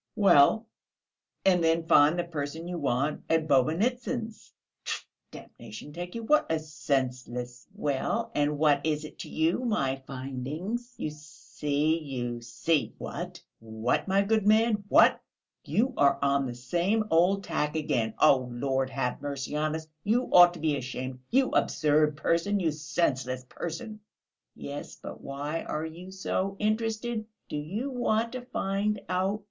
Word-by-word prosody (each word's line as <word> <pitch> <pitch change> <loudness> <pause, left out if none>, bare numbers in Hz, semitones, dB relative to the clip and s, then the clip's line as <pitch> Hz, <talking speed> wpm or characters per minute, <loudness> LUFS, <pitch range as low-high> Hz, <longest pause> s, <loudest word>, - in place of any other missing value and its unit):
"Well, 200 +2 +5 0.8
and 180 -3 +4
then 165 0 +2
find 155 +1 +5
the 175 - +1
person 160 0 -5
you 175 -1 -4
want 140 +1 0
at 160 -1 +2
Bobynitsyn's. 220 - 0 0.3
Tfoo, - - -4 0.2
damnation 115 +6 -11
take 175 +3 -6
you, 230 - -4
what 300 - +3
a 160 - +2
senseless...." 130 -5 -3
"Well, 185 +11 -1
and 145 0 +1
what 145 -2 +3
is 155 -1 -1
it - - -12
to - - -7
you, 160 +5 +1
my 210 - 0
finding? 135 - -4 0.2
You 155 - -3
see, 150 +1 -2
you 120 -5 -4
see!" 130 +6 -1
"What, - - -6 0.2
what, 110 - -1
my 195 +1 +3
good 215 0 +1
man? 215 -1 +4
What? - - +5 0.4
You 255 +4 +1
are 140 -1 +4
on 140 -1 +2
the 120 - -5
same 175 - 0
old 180 +4 +3
tack 150 -4 -1
again. 125 -8 0
Oh, 130 -4 +4
Lord 130 +2 -1
have 135 -2 -2
mercy 140 0 -4
on 155 +1 0
us! 160 0 -6 0.2
You 235 +5 +1
ought 175 -1 +8
to - - -9
be 155 -2 +1
ashamed, 130 0 -5
you 265 +1 +3
absurd 150 0 +2
person, 170 +6 +1
you 165 -4 +1
senseless 135 -4 -1
person!" 215 - -6 0.6
"Yes, 140 +1 -7
but - - -9
why 145 +4 -4
are 155 +1 -3
you 170 +3 -9
so 190 0 -2
interested? 220 +1 -1 0.2
Do - - -3
you 200 - -3
want 230 -2 0
to 255 - -5
find 210 -4 -1
out...." 190 +3 0
155 Hz, 150 wpm, -28 LUFS, 140-200 Hz, 0.8 s, ought